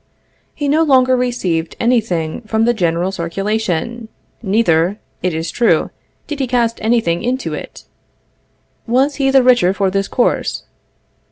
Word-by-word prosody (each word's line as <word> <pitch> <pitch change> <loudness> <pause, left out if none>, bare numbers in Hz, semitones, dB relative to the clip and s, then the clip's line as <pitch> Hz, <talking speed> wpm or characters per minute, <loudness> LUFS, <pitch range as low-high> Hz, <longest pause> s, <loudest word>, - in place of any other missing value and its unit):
He 290 - -2
no 300 +3 +3
longer 260 -4 +4
received 195 -10 -1
any 240 0 +3
thing 170 -2 -3
from 220 +1 +1
the 240 - +3
general 175 -2 0
circulation; 195 +4 -2 0.3
neither, 195 -4 +1 0.2
it 180 - 0
is 160 +1 -3
true, 240 - +2 0.3
did 295 -1 -6
he 265 - 0
cast 235 -2 0
any 230 +2 +3
thing 170 -3 -1
into 250 +3 -2
it. - - -8 1.0
Was 265 +5 +1
he 270 -2 +2
the 270 -1 +5
richer 240 -7 +4
for 195 -2 0
this 195 0 -1
course? 245 - 0
225 Hz, 150 wpm, -17 LUFS, 180-250 Hz, 1.0 s, the